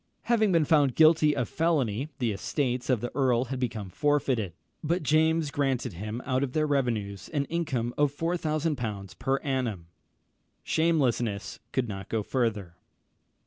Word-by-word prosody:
Having 220 -3 +2
been 165 -3 +3
found 145 -5 +3
guilty 155 -1 +5
of 120 - -1
felony, 145 -5 0
the 120 -3 0
estates 125 +5 -2
of 125 -5 +2
the 120 - -3
earl 130 -2 +2
had 130 0 -4
become 110 -6 -3
forfeited; 135 - +1 0.3
but 170 +2 0
James 155 +1 +2
granted 135 -7 -1
him 105 +7 -5
out 130 -1 0
of 130 -2 -3
their 155 -1 +2
revenues 115 - -1
an 145 -2 +1
income 135 -8 -2
of 145 -2 +3
4000l. 150 - -2
per 135 +1 +1
annum! 125 - -2 0.8
Shamelessness 130 - 0
could 130 -2 0
go 100 -2 -5
no 110 -2 +1
further. 105 -8 -2
130 Hz, 145 wpm, -28 LUFS, 115-155 Hz, 0.8 s, guilty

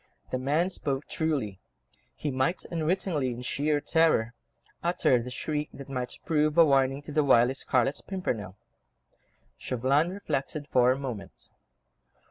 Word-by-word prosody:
The 130 - -1
man 155 +8 +1
spoke 140 -4 -3
truly; 135 - -2 0.6
he 150 - -3
might 130 +7 0
unwittingly, 165 -4 0
in 120 0 -6
sheer 145 +4 0
terror, 150 -8 +2 0.5
utter 170 -8 +2
the 125 - -6
shriek 150 +4 -3
that 140 0 -10
might 125 -2 -4
prove 155 -1 +1
a 165 - +8
warning 135 -1 +2
to 150 - -8
the 150 0 +2
wily 125 -2 +5
Scarlet 135 0 0
Pimpernel. 110 - -3 1.0
Chauvelin 135 +6 +1
reflected 150 -6 -3
for 125 0 +4
a 130 - 0
moment. 115 -9 -7
140 Hz, 135 wpm, -28 LUFS, 125-155 Hz, 1.0 s, a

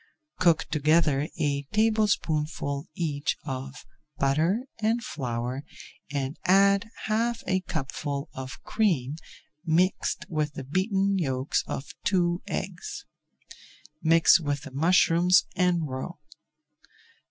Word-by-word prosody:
Cook 170 -3 +4
together 150 -1 +2
a 140 -2 0
tablespoonful 165 -9 +1
each 150 -4 -1
of 135 0 -6 0.3
butter 160 - +2 0.2
and 225 +2 +1
flour 125 - -3 0.5
and 140 +1 -3
add 200 +3 +4
half 225 +2 0
a 185 0 +1
cupful 145 -3 -4
of 130 -1 -8
cream 155 - 0 0.5
mixed 180 +3 +1
with 150 -2 -1
the 135 - -6
beaten 195 - +1
yolks 130 -4 0
of 135 - -5
two 175 -2 +1
eggs. 185 -2 -5 1.0
Mix 165 +1 +6
with 145 -3 -2
the 140 - -9
mushrooms 175 +4 +4
and 175 -3 +2
roe. 130 +7 -5
160 Hz, 105 wpm, -27 LUFS, 140-185 Hz, 1.0 s, Mix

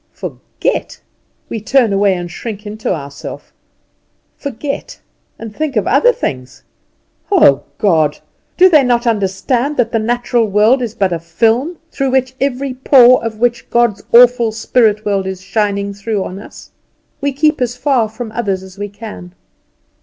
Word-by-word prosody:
Forget! - - -4 0.5
We 225 - -5
turn 235 -1 +2
away 195 -1 +2
and 175 -1 -6
shrink 210 +2 -7
into 215 +1 -4
ourself. 140 -4 -7 0.8
Forget, 280 +1 -6 0.4
and 225 -2 -9
think 305 -3 -3
of - - +1
other - - +4
things! 130 - -5 0.7
Oh, 320 - +4
God! 160 -7 +2 0.4
do 370 - +7
they 310 -6 +5
not 245 -1 +1
understand 230 +6 0
that 235 -2 +1
the 225 - +1
material 240 0 0
world 215 +6 +3
is 230 -2 -4
but 195 -5 0
a 170 - -2
film, 230 - 0
through 265 -1 +1 0.2
every 275 0 -1
pore 255 -1 +5
of 225 -1 -4
which 240 0 0
God's 235 -4 +1
awful 240 -1 +5
spirit 220 -1 +1
world 195 -2 0
is 190 -1 -5
shining 200 0 -1
through 200 0 -3
on 185 - -7
us? - - -13 0.5
We 285 0 0
keep 300 +1 +1
as 245 0 -1
far 250 -5 +1
from 220 0 -7
others 200 -5 -2
as 190 +1 -14
we 205 0 -4
can. 205 -4 -10
225 Hz, 155 wpm, -15 LUFS, 200-250 Hz, 0.8 s, do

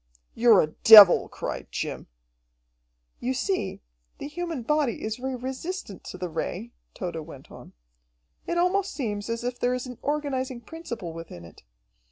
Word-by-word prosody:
"You're 230 -4 +5
a 155 - -2
devil!" 210 -4 +10
cried - - -6
Jim. - - -4 1.1
"You 260 +2 -2
see, 265 - -2 0.4
the - - -6
human 330 -3 -5
body 295 -2 0
is 215 0 -3
very 260 +1 -4
resistant 260 - -6
to - - -8
the 180 - -4
Ray," 180 +7 -5 0.2
Tode 175 -3 -5
went 150 -4 -10
on. - - -13 0.7
"It 345 - -1
almost 375 +3 +1
seems 210 -6 -4
as 230 0 -3
if 245 0 -4
there 250 +1 +1
is 250 - -5
an 250 -2 -9
organizing 270 -4 -2
principle 235 - -7
within 165 - -10
it. 85 - -16
245 Hz, 155 wpm, -26 LUFS, 200-290 Hz, 1.1 s, devil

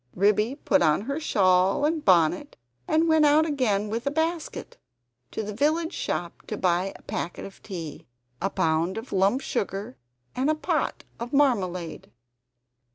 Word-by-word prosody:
Ribby 210 +6 +2
put 285 -1 +1
on 155 +3 +3
her 275 +7 -3
shawl 190 -4 +3
and 310 0 0
bonnet 185 - +3 0.3
and 320 +1 +2
went 315 -1 +4
out 300 +2 +5
again 240 -9 0
with 230 +5 -3
a - - +4
basket, 320 +2 -3 0.5
to 220 - -4
the 210 0 -5
village 315 - +1
shop 170 -1 -3
to 215 - -4
buy 180 +1 +1
a - - -15
packet 175 - -4
of 195 - -12
tea, 165 -7 -7 0.3
a 195 - +1
pound 170 +1 0
of 225 +3 -7
lump 195 +7 +2
sugar, 195 - -3 0.4
and 265 +4 +1
a 310 - +3
pot 305 - -1 0.2
of 240 +3 -6
marmalade. 185 - 0
215 Hz, 160 wpm, -26 LUFS, 185-290 Hz, 0.5 s, out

